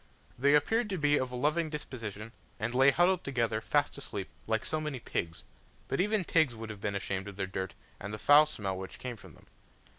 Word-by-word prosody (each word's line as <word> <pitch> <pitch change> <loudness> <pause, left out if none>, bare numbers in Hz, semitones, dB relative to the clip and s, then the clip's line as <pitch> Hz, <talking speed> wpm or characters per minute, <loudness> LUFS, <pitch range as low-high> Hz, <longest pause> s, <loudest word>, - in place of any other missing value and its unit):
There 140 +3 +4
appeared 225 +9 +1
to 190 - -2
be 145 -2 +3
of 130 -1 -2
a - - -5
loving 155 +5 +1
disposition, 115 -8 -6 0.3
and 115 +4 -2
lay 135 +2 +6
huddled 175 +5 +3
together, 115 -5 0
fast 145 +5 +1
asleep, 100 -8 -5 0.2
like 110 -1 0
so 155 0 0
many 150 -4 -3
pigs; 85 -7 -4 0.4
but - - 0
even 210 0 +1
pigs 155 -8 +3
would 110 0 -6
have 105 -2 -10
been 100 -1 -2
ashamed 95 0 -3
of 100 - -8
their 95 -1 -2
dirt, 95 0 -4 0.2
and 100 - -6
of 105 - -5
the - - -14
foul 150 +1 +8
smell 100 -10 -4
which 95 - -7
came 125 -2 -5
from - - -14
them. - - -20
125 Hz, 220 wpm, -31 LUFS, 105-150 Hz, 0.4 s, foul